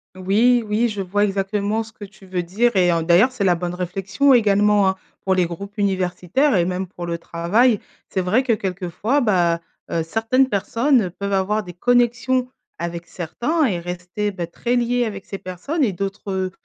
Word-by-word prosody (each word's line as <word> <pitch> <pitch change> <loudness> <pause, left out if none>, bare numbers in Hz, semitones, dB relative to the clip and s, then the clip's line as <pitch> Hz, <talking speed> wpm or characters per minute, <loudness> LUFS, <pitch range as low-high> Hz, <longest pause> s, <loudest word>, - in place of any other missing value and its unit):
Oui 220 +6 +3
oui. 220 +3 +1
Je 205 -2 -4
vois 200 +2 0
exactement 200 +2 0
ce 220 - -14
que 210 - -11
tu 200 0 -13
veux 185 -1 -2
dire 215 +7 0
et 180 -2 +4
en 165 -1 +1
d'ailleurs, 175 +10 +5
c'est 255 -5 -3
la 185 -2 +4
bonne 175 +1 -4
réflexion 195 +9 +1
également, 210 -3 +4
hein, 190 - -1 0.3
pour 190 -1 +2
les 180 -1 +3
groupes 200 +5 -8
universitaires 195 - +1
et 175 -2 +3
même 185 +1 -2
pour 175 -1 -8
le 170 -1 -3
travail. 200 +8 +2 0.3
C'est 190 - -1
vrai 185 +8 +2
que, 255 -3 +1
quelquefois, 195 - -1
bah, 175 -7 +2 0.3
heu, 165 - 0
certaines 225 +9 +1
personnes 230 +1 +1
peuvent 200 +3 -4
avoir 195 +3 +1
des 180 - -9
connexions 245 +4 +1 0.3
avec 170 0 -4
certains 240 - -1
et 190 -9 0
rester, 180 +4 -4
beh, 175 -4 -5
très 240 +8 -2
liées 245 0 +1
avec 200 -3 -6
ces 195 - -6
personnes 195 - -3
et 215 -7 +1
d'autres, 195 +2 -4
heu, 190 -1 -1
200 Hz, 190 wpm, -21 LUFS, 180-230 Hz, 0.3 s, d'ailleurs